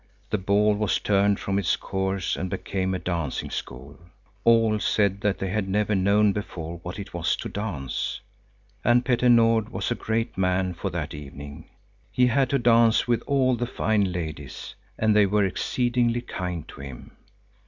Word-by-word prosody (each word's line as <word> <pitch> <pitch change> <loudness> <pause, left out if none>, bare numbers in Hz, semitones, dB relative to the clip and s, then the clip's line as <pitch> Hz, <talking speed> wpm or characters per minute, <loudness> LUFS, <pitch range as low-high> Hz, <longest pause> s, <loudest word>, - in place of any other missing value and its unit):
The 105 - +1
ball 100 +2 +3
was 105 -3 +1
turned 100 0 +2
from 100 0 -1
its 95 - +1
course 95 -1 -2
and 95 - -3
became 95 +1 -2
a - - 0
dancing 85 -6 -3
school. 70 +3 -7 0.4
All 115 -2 +4
said 100 -2 +1
that 105 -1 +1
they 95 - -3
had 100 -2 -1
never 105 +2 +1
known 100 +1 +3
before 85 -5 -6
what 90 +1 -7
it 100 - -8
was - - 0
to - - -6
dance. 95 -11 -3 0.6
And 120 +1 +3
Petter 125 -1 +2
Nord 115 -2 +4
was - - -3
a - - +4
great 115 -1 -2
man 90 0 +1
for 80 - -4
that - - -4
evening. 70 +2 -9 0.4
He 125 - +3
had 130 +1 +2
to 140 - +2
dance 115 -2 +4
with 120 -1 +1
all 130 -2 +3
the 120 +1 -2
fine 105 -5 +1
ladies, 80 -6 -6 0.2
and 110 -1 +2
they 105 -1 +5
were 105 +1 +2
exceedingly 120 +4 0
kind 90 -8 -5
to - - -10
him. 65 -3 -9
100 Hz, 175 wpm, -25 LUFS, 90-115 Hz, 0.6 s, they